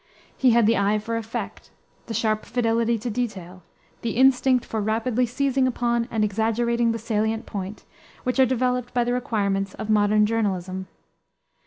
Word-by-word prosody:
He 260 - +3
had 235 -1 +4
the 225 -1 +3
eye 200 +2 +2
for 225 +2 -4
effect, 225 0 -5 0.4
the 225 - -4
sharp 215 -1 0
fidelity 230 -1 +1
to 235 +2 -4
detail, 190 -6 -4 0.4
the 230 -1 -3
instinct 260 -1 +4
for 220 - -3
rapidly 230 +3 0
seizing 265 +1 +1
upon 235 -1 0
and 220 -3 0
exaggerating 230 +3 +1
the 230 - -2
salient 220 0 -1
point, 200 0 -6 0.4
which 255 +1 -1
are 260 - +6
developed 250 0 -1
by 245 - +3
the 245 +1 -1
requirements 200 -5 -1
of 215 - -4
modern 210 0 +4
journalism. 190 -4 -2
230 Hz, 160 wpm, -24 LUFS, 210-245 Hz, 0.4 s, are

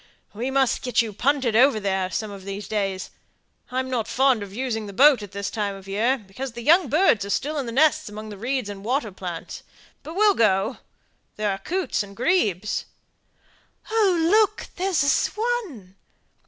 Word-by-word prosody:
"We 235 +5 -3
must 265 -2 +1
get 250 -2 +2
you 220 -2 -6
punted 255 0 +1
over 255 -1 +5
there, 190 -2 -1
some 215 +2 -3
of 195 -1 -9
these 200 +1 -6
days. 195 -3 -2 0.6
I'm 260 +1 -2
not 245 -4 -2
fond 260 -3 +2
of 200 -1 -7
using 225 -1 -3
the 200 - -8
boat 275 +2 +6
at 205 -2 -9
this 200 0 -4
time 205 -3 -2
of 195 -1 -12
the 195 - -8
year, 235 +7 +2
because 230 +4 -8
the 235 0 -7
young 330 +2 +4
birds 300 - +3
are 200 - -6
still 295 +8 -1
in 265 - -3
the - - -4
nests 290 -1 +3
among 215 +1 -8
the 205 - -8
reeds 250 0 -2
and 200 -1 -8
water 240 -1 -1
plants; 180 -3 -7 0.4
but 315 +4 -9
we'll 415 +1 +5
go. 215 - +2 0.6
There 210 -1 -1
are 195 - -4
coots 360 - -1
and 200 -1 -9
grebes." 215 - 0 1.1
"Oh, 415 -5 +3
look, 420 +5 +2
there's 365 -5 +1
a 280 - +2
swan!" 425 - -1
235 Hz, 190 wpm, -24 LUFS, 200-285 Hz, 1.1 s, boat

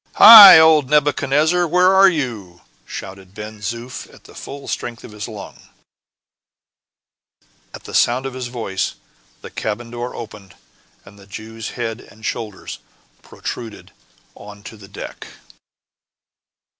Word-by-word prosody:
"Hi! 210 -5 +11
old 160 -4 +4
Nebuchadnezzar, 150 +3 +1
where 180 +3 +2
are 195 0 +6
you?" 110 - -6 0.3
shouted 95 0 -10
Ben 105 0 -10
Zoof, 120 +4 -8
at - - -20
the - - -17
full 140 0 -11
strength 120 -2 -6
of - - -12
his 105 0 -8
lungs. 110 -3 -11 2.1
At - - -12
the - - -12
sound 125 +3 +1
of 135 - -6
his 130 -1 -6
voice, 110 -6 -5 0.5
the - - -11
cabin 115 +2 -6
door 120 +1 -7
opened, 105 -5 -11 0.5
and 100 +1 -17
the 100 - -18
Jew's 110 +2 -9
head 115 -1 -5
and 110 +1 -16
shoulders 105 -4 -7 0.4
protruded 115 -3 -9 0.4
onto 105 +1 -13
the 100 -2 -15
deck. - - -10
115 Hz, 130 wpm, -18 LUFS, 105-140 Hz, 2.1 s, Hi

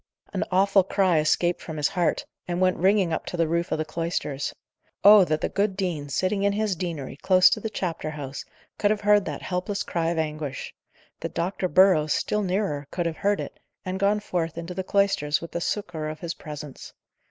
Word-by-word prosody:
An - - 0
awful 195 +1 +4
cry 185 -3 +2
escaped 175 +3 +1
from 160 -2 -7
his 145 -2 +1
heart, 175 -3 0 0.2
and 175 0 -2
went 185 -1 +2
ringing 190 -2 +3
up - - -3
to 180 - -4
the 165 -1 +2
roof 170 +2 -1
of - - +1
the 155 - -2
cloisters. 160 -4 -3 0.5
Oh! 205 0 +9
that 155 -2 -1
the - - +1
good 200 -1 -1
dean, 170 -7 -2
sitting 185 +7 0
in 200 0 +2
his 210 -2 0
deanery 160 -7 -5
close 185 +2 +5
to 225 - +1
the 220 - -4
chapter 170 -6 -3
house, 140 -3 -6 0.4
could 205 - +3
have 210 0 0
heard 205 -1 +4
that - - -5
helpless 185 +2 -2
cry 165 -1 -1
of 170 - -2
anguish! 150 -3 -3 0.5
that - - -6
Dr. 185 +2 -1
Burrows, 175 -3 +4
still 210 - 0
nearer, 185 -7 -1
could 175 -1 -2
have 165 -1 -2
heard 205 0 +1
it, - - -7 0.3
and 185 +1 -3
gone 200 +1 +2
forth 170 -5 -3
into 170 +2 -5
the 190 +1 -3
cloisters 195 -7 +1
with 170 -1 -9
the 170 - -3
succour 170 -6 -3
of 155 0 -8
his 170 -1 -3
presence! 150 -2 -9
175 Hz, 210 wpm, -25 LUFS, 155-195 Hz, 0.5 s, Oh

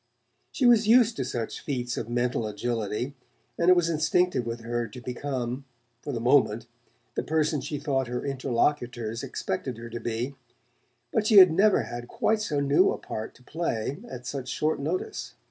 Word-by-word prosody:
She 260 - 0
was 230 -3 +6
used 235 0 +6
to 135 - 0
such 120 -2 -4
feats 125 -4 -3
of - - -4
mental 120 -2 0
agility, 115 +3 -2 0.4
and 170 +1 +2
it 185 - +8
was 175 -2 +2
instinctive 160 -4 +1
with 115 0 -4
her 120 0 -2
to 115 - -10
become, 125 0 -4 0.4
for 145 - -5
the 120 - -2
moment, 115 -2 +3 0.5
the - - -1
person 155 -2 0
she 145 +2 -4
thought 135 -3 -1
her 125 +2 -4
interlocutors 120 -4 -1
expected 120 +5 -4
her 120 0 -9
to 120 - -4
be; 120 +4 -3 0.8
but 215 -2 +2
she 215 - +6
had 185 -3 +10
never 200 +5 +4
had 120 0 -7
quite 220 - +1
so 150 -9 -1
new 140 0 +4
a - - -1
part 110 0 -6
to 125 - -20
play 145 -2 -2
at 125 0 -8
such 130 0 -4
short 155 +3 0
notice. 160 +6 -3
130 Hz, 180 wpm, -27 LUFS, 120-155 Hz, 0.8 s, had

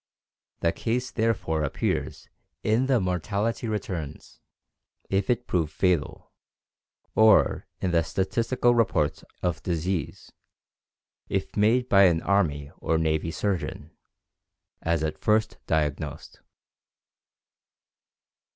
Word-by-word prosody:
The 85 - +3
case 125 +6 -2
therefore 110 -9 0
appears 70 - -2 0.4
in 115 +5 +2
the 130 -3 +3
mortality 100 +6 -1
returns, 90 - -5 0.7
if 95 0 +1
it 120 0 +1
prove 80 -7 0
fatal, 90 -2 -1 0.8
or 110 -1 +4
in 90 - 0
the 85 -1 +3
statistical 115 +8 +1
reports 95 -11 +1 0.2
of 90 -3 -1
disease, 85 0 -3 1.0
if 95 0 -2
made 115 +4 +3
by 100 -3 +6
an 85 -3 +3
army 75 -8 +1
or 80 - +1
navy 80 0 0
surgeon, 80 -3 -3 0.9
as 80 -1 0
at 75 - -3
first 110 +1 +1
diagnosed." 75 -3 -2
95 Hz, 100 wpm, -26 LUFS, 80-110 Hz, 1.0 s, by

